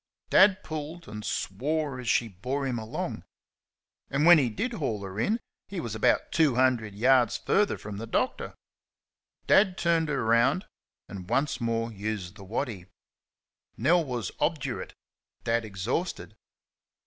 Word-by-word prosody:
Dad 190 Hz, -1 st, +6 dB
pulled 155 Hz, +2 st, -6 dB
and 105 Hz, 0 st, -7 dB
swore 135 Hz, +8 st, -2 dB
as 125 Hz, -2 st, -4 dB
she 115 Hz, 0 st, +3 dB
bore 125 Hz, +8 st, -3 dB
him 125 Hz, -3 st, -1 dB
along. 110 Hz, 0 st, -4 dB, 0.9 s
And 140 Hz, +3 st, +1 dB
when 175 Hz, -1 st, +9 dB
he 130 Hz, -4 st, +1 dB
did 235 Hz, -, -3 dB
haul 115 Hz, -, -2 dB
her 95 Hz, +1 st, -6 dB
in, 215 Hz, -, +1 dB, 0.3 s
he 195 Hz, -, -5 dB
was 115 Hz, -8 st, -4 dB, 0.4 s
two 155 Hz, -6 st, +3 dB
hundred 120 Hz, -5 st, +2 dB
yards 125 Hz, +1 st, +4 dB
further 205 Hz, 0 st, +1 dB
from 105 Hz, -2 st, -7 dB
the 115 Hz, +2 st, -6 dB
doctor. 255 Hz, -, -1 dB, 0.9 s
Dad 190 Hz, -2 st, +4 dB
turned 165 Hz, -2 st, +1 dB
her 140 Hz, -5 st, -1 dB
round 115 Hz, -, +3 dB, 0.4 s
and 90 Hz, -2 st, -9 dB
once 145 Hz, 0 st, 0 dB
more 115 Hz, 0 st, -1 dB
used 100 Hz, -3 st, -4 dB
the 100 Hz, -, -11 dB
waddy. 105 Hz, -2 st, -4 dB, 0.9 s
Nell 165 Hz, +9 st, +3 dB
was 120 Hz, -8 st, -4 dB
obdurate, 140 Hz, -6 st, -2 dB, 0.5 s
Dad 115 Hz, 0 st, +1 dB
exhausted. 110 Hz, -, -3 dB
125 Hz, 140 wpm, -28 LUFS, 110-155 Hz, 0.9 s, when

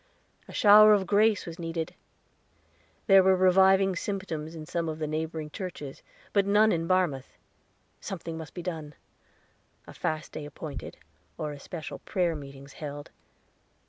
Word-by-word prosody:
A -, -, -11 dB
shower 215 Hz, +1 st, +7 dB
of 200 Hz, -2 st, +2 dB
grace 210 Hz, +3 st, +3 dB
was 170 Hz, +1 st, -8 dB
needed; 165 Hz, -1 st, -4 dB, 1.1 s
there 195 Hz, -2 st, +7 dB
were 190 Hz, 0 st, +4 dB
reviving 190 Hz, +1 st, +4 dB
symptoms 170 Hz, -5 st, -4 dB
in 155 Hz, -1 st, -8 dB
some 170 Hz, 0 st, -2 dB
of 155 Hz, -, -4 dB
the 155 Hz, -, -3 dB
neighboring 155 Hz, 0 st, -4 dB
churches, 160 Hz, -7 st, -7 dB, 0.3 s
but 200 Hz, -1 st, +3 dB
none 210 Hz, +2 st, +5 dB
in 165 Hz, -1 st, -1 dB
Barmouth. 175 Hz, -8 st, 0 dB, 0.6 s
Something 170 Hz, -3 st, -6 dB
must 160 Hz, -1 st, -9 dB
be 175 Hz, -, -6 dB
done 160 Hz, -5 st, -5 dB, 0.9 s
a -, -, -12 dB
fast 155 Hz, -1 st, -3 dB
day 155 Hz, -, -6 dB
appointed, 150 Hz, +1 st, -8 dB, 0.4 s
or 150 Hz, -1 st, -3 dB
especial 150 Hz, +3 st, -7 dB
prayer 175 Hz, -3 st, -1 dB
meetings 140 Hz, -1 st, -10 dB
held. 145 Hz, -1 st, -8 dB
165 Hz, 145 wpm, -28 LUFS, 155-190 Hz, 1.1 s, shower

